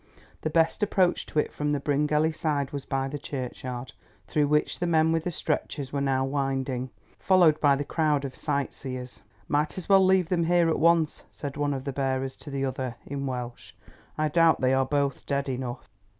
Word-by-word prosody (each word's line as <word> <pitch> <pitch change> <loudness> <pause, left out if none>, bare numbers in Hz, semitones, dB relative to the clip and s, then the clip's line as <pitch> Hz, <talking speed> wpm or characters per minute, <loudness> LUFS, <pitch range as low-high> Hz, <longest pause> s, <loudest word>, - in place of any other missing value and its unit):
The 155 - -1
best 165 +5 +2
approach 190 -3 +2
to - - -7
it 150 - +1
from 150 0 -2
the 145 -1 +1
Bryngelly 150 +2 +1
side 145 -3 -1
was 140 -2 -5
by 135 0 -1
the 145 +2 -5
churchyard, 130 -2 -5 0.3
through 145 +7 +1
which 150 +1 +1
the 175 - 0
men 160 -1 +3
with 165 0 0
the - - 0
stretchers 145 -3 -3
were 140 - 0
now 135 -1 +1
winding, 135 -2 -2 0.3
followed 175 -5 +4
by 145 -2 +5
the 140 - -2
crowd 150 -2 +1
of 130 - -6
sightseers. 135 -3 -4 0.3
"Might 150 +4 0
as 185 - -5
well 195 -1 +6
leave 185 -2 +3
them 170 -2 +1
here 175 0 +3
at 160 - 0
once," 165 -1 +3
said 140 -2 -7
one 145 -1 0
of 130 - -5
the 140 - -4
bearers 135 -1 -1
to - - -11
the 135 -1 -1
other 130 -2 -3
in 140 0 -4
Welsh. 125 -2 -6 0.4
"I 155 0 +1
doubt 165 +1 +4
they 130 0 +2
are 130 0 +2
both 140 -1 -1
dead 140 0 -1
enough." 125 -2 -4
145 Hz, 200 wpm, -27 LUFS, 135-160 Hz, 0.4 s, well